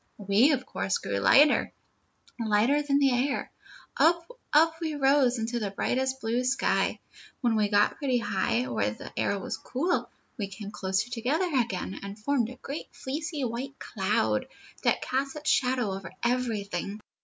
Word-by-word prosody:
"We, 205 Hz, +8 st, +4 dB
of 260 Hz, -2 st, -2 dB
course, 190 Hz, -, -1 dB
grew 100 Hz, 0 st, -3 dB
lighter, 280 Hz, -, +5 dB, 0.7 s
lighter 230 Hz, +6 st, +3 dB
than 285 Hz, -1 st, +1 dB
the 275 Hz, -2 st, +4 dB
air. 260 Hz, +3 st, 0 dB, 0.4 s
Up, 335 Hz, +1 st, +3 dB, 0.2 s
up 320 Hz, +2 st, +5 dB
we 315 Hz, -2 st, -2 dB
rose 270 Hz, -3 st, +3 dB
into 235 Hz, +1 st, -2 dB
the 210 Hz, -3 st, -2 dB
bright 225 Hz, +5 st, -1 dB, 0.2 s
blue 230 Hz, +3 st, 0 dB
sky. 260 Hz, +2 st, +1 dB, 0.4 s
When 240 Hz, -3 st, +2 dB
we 210 Hz, -1 st, +2 dB
got 205 Hz, 0 st, +3 dB
pretty 270 Hz, -5 st, +1 dB
high, 190 Hz, -, 0 dB
where 120 Hz, -3 st, 0 dB
the 105 Hz, -, -9 dB
air 200 Hz, -, 0 dB
was 195 Hz, -, -4 dB
cool, 325 Hz, +8 st, -1 dB, 0.3 s
we 200 Hz, -, -1 dB
came 200 Hz, +1 st, -8 dB
closer 195 Hz, +4 st, -1 dB
together 280 Hz, +10 st, 0 dB
again 225 Hz, -7 st, -1 dB
and 200 Hz, +1 st, -7 dB
formed 240 Hz, 0 st, 0 dB
a 255 Hz, -, -9 dB
great 275 Hz, +4 st, -6 dB
fleecy 300 Hz, +2 st, -4 dB
white 255 Hz, +3 st, -4 dB
cloud, 190 Hz, -, 0 dB, 0.3 s
that -, -, +1 dB
cast 270 Hz, +2 st, -1 dB
its 300 Hz, 0 st, 0 dB
shadow 250 Hz, -5 st, +1 dB
over 190 Hz, -3 st, -6 dB
everything. 215 Hz, -5 st, -1 dB
240 Hz, 160 wpm, -28 LUFS, 205-275 Hz, 0.7 s, lighter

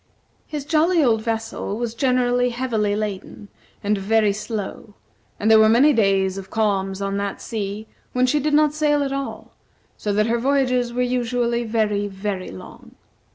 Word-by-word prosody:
His 295 Hz, -2 st, -5 dB
jolly 325 Hz, +2 st, +3 dB
old 225 Hz, -4 st, +2 dB
vessel 225 Hz, -2 st, -3 dB
was 235 Hz, -1 st, -3 dB
generally 250 Hz, 0 st, +1 dB
heavily 230 Hz, -4 st, -1 dB
laden, 205 Hz, -1 st, -5 dB, 0.3 s
and 205 Hz, 0 st, +1 dB
very 210 Hz, +1 st, +2 dB
slow, 210 Hz, 0 st, -6 dB, 0.4 s
and 215 Hz, +2 st, +2 dB
there 220 Hz, -, +8 dB
were 220 Hz, 0 st, +6 dB
many 265 Hz, +7 st, +5 dB
days 195 Hz, -4 st, +2 dB
of 190 Hz, 0 st, -10 dB
calms 200 Hz, -3 st, -1 dB
on 195 Hz, 0 st, -2 dB
that 200 Hz, 0 st, -3 dB
sea 210 Hz, -1 st, -5 dB, 0.3 s
when 250 Hz, 0 st, +2 dB
she 295 Hz, +4 st, +2 dB
did 295 Hz, +1 st, +1 dB
not 300 Hz, -1 st, +4 dB
sail 295 Hz, -1 st, +2 dB
at 275 Hz, -1 st, -2 dB
all, 275 Hz, 0 st, -5 dB, 0.4 s
so 210 Hz, -, -2 dB
that 210 Hz, +1 st, +2 dB
her 235 Hz, +1 st, 0 dB
voyages 255 Hz, -2 st, +1 dB
were 250 Hz, +1 st, 0 dB
usually 240 Hz, -1 st, 0 dB
very, 210 Hz, -2 st, 0 dB
very 195 Hz, -1 st, -4 dB
long. 95 Hz, -1 st, -12 dB
225 Hz, 165 wpm, -22 LUFS, 205-250 Hz, 0.4 s, there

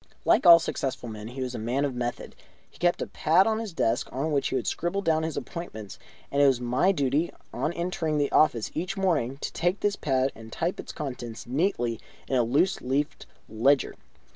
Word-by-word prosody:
Like -, -, +4 dB
all 170 Hz, -1 st, +11 dB
successful 135 Hz, -6 st, -3 dB
men, 105 Hz, -1 st, -7 dB
he 130 Hz, +3 st, -7 dB
was 125 Hz, -1 st, -4 dB
a -, -, -4 dB
man 125 Hz, +6 st, 0 dB
of 140 Hz, -, -2 dB
method. 120 Hz, -1 st, -4 dB, 0.4 s
He -, -, -20 dB
kept 175 Hz, 0 st, +2 dB
a -, -, -3 dB
pad 175 Hz, +3 st, +3 dB
on 220 Hz, 0 st, +1 dB
his 225 Hz, -3 st, -5 dB
desk 120 Hz, -8 st, 0 dB
on 145 Hz, +5 st, -2 dB
which 140 Hz, -2 st, +1 dB
he -, -, -2 dB
would 130 Hz, -, -1 dB
scribble 195 Hz, +4 st, -1 dB
down 160 Hz, -2 st, +2 dB
his 160 Hz, -1 st, -3 dB
appointments, 110 Hz, -, -7 dB, 0.3 s
and 140 Hz, -, +2 dB
it 140 Hz, -, +7 dB
was 130 Hz, -3 st, +3 dB
my 125 Hz, +10 st, +2 dB
duty 145 Hz, 0 st, 0 dB, 0.2 s
on 155 Hz, -, -1 dB
entering 170 Hz, -3 st, -1 dB
the 145 Hz, -1 st, +1 dB
office 120 Hz, -8 st, +3 dB
each 180 Hz, +5 st, -3 dB
morning 150 Hz, -10 st, 0 dB
to -, -, -4 dB
take 175 Hz, +4 st, 0 dB
this 205 Hz, -1 st, +1 dB
pad 135 Hz, -4 st, 0 dB
and 110 Hz, 0 st, -12 dB
type 170 Hz, +8 st, -2 dB
its -, -, -6 dB
contents 125 Hz, -6 st, -6 dB
neatly 125 Hz, -, 0 dB, 0.3 s
in 135 Hz, -, -1 dB
a 125 Hz, -, +4 dB
loose 145 Hz, +11 st, +1 dB
leaved 135 Hz, +3 st, -2 dB, 0.2 s
ledger. 130 Hz, +6 st, +2 dB
145 Hz, 210 wpm, -27 LUFS, 125-170 Hz, 0.4 s, all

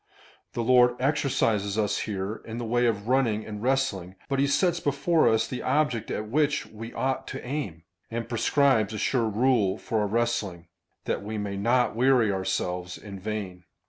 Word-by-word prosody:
" -, -, -32 dB
The 120 Hz, -, -1 dB
Lord 125 Hz, 0 st, +5 dB
exercises 120 Hz, -7 st, +1 dB
us 105 Hz, -2 st, +1 dB
here 100 Hz, +1 st, -3 dB
in 115 Hz, 0 st, -7 dB
the 120 Hz, -, -3 dB
way 120 Hz, +2 st, +2 dB
of 105 Hz, -2 st, -1 dB
running 120 Hz, -5 st, +1 dB
and 105 Hz, -1 st, -7 dB
wrestling, 120 Hz, -8 st, 0 dB
but 135 Hz, -1 st, 0 dB
he 140 Hz, -, +3 dB
sets 175 Hz, +4 st, +2 dB
before 155 Hz, +3 st, +2 dB
us 110 Hz, 0 st, +2 dB
the 125 Hz, -, -5 dB
object 145 Hz, -6 st, 0 dB
at 105 Hz, -, -3 dB
which 145 Hz, +4 st, +1 dB
we 115 Hz, +2 st, -9 dB
ought 130 Hz, 0 st, -2 dB
to -, -, -6 dB
aim, 120 Hz, -, -4 dB, 0.3 s
and 115 Hz, 0 st, -4 dB
prescribes 115 Hz, -2 st, +2 dB
a -, -, -3 dB
sure 115 Hz, +1 st, +1 dB
rule 110 Hz, -3 st, +2 dB
for 110 Hz, -, -2 dB
our 105 Hz, -, +1 dB
wrestling, 105 Hz, -6 st, -1 dB, 0.4 s
that -, -, -1 dB
we 110 Hz, +2 st, -5 dB
may 100 Hz, -1 st, -3 dB
not 120 Hz, +4 st, +2 dB
weary 125 Hz, -3 st, +4 dB
ourselves 90 Hz, -1 st, -2 dB
in 100 Hz, -2 st, -9 dB
vain." 95 Hz, -3 st, -5 dB
115 Hz, 180 wpm, -26 LUFS, 105-130 Hz, 0.4 s, Lord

